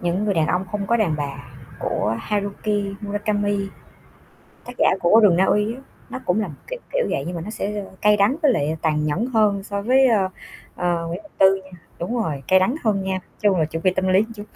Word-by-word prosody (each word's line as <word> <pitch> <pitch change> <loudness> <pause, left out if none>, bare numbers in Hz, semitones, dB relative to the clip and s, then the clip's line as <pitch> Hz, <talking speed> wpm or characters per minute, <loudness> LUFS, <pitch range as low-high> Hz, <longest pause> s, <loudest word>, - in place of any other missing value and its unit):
Những 175 +4 -1
người 205 - +1
đàn 160 -2 +2
ông 180 +3 0
không 200 -1 -2
có 235 - +3
đàn 195 -9 +1
bà 140 -1 -6 0.3
của 110 +1 -1
Haruki 205 -1 -2
Murakami. 205 -1 -1 1.0
Tác 245 - -8
giả - - +4
của 210 +6 +5
Rừng 195 -5 +5
Na 185 - +4
Uy 210 +3 +1
á, 260 - -11 0.3
nó - - -5
cũng 180 +4 +1
là 210 - -2
một 150 - -9
kiểu - - -5
kiểu - - +1
vậy, 135 - -1
nhưng 175 +1 -4
mà 165 - -5
nó 210 - -6
sẽ, 210 -1 -3
ơ, 195 - -9
cay 210 0 +5
đắng 205 +7 +3
với 290 -4 +5
lại 155 -6 0
tàn 150 -2 +1
nhẫn 155 +10 0
hơn 215 -5 +2
so 200 0 -4
với, 260 +5 +4
ơ, 210 -6 +3 0.5
ờ, 175 -1 -1
Nguyễn 170 +3 -4
Ngọc 205 - -18
Tư 195 0 +5
nha 185 -2 -14 0.2
đúng 220 +9 -3
rồi, 145 -8 -3
cay 190 - +6
đắng 215 +9 +1
hơn 200 -3 +1
nha, 190 - -1
nói 190 - -2 0.2
chung 200 -3 +3
là 160 - +3
chuẩn 165 +1 -5
bị 185 - +3
tâm 190 0 0
lý 190 +3 +4
chút. 205 - -7
200 Hz, 245 wpm, -22 LUFS, 175-210 Hz, 1.0 s, cay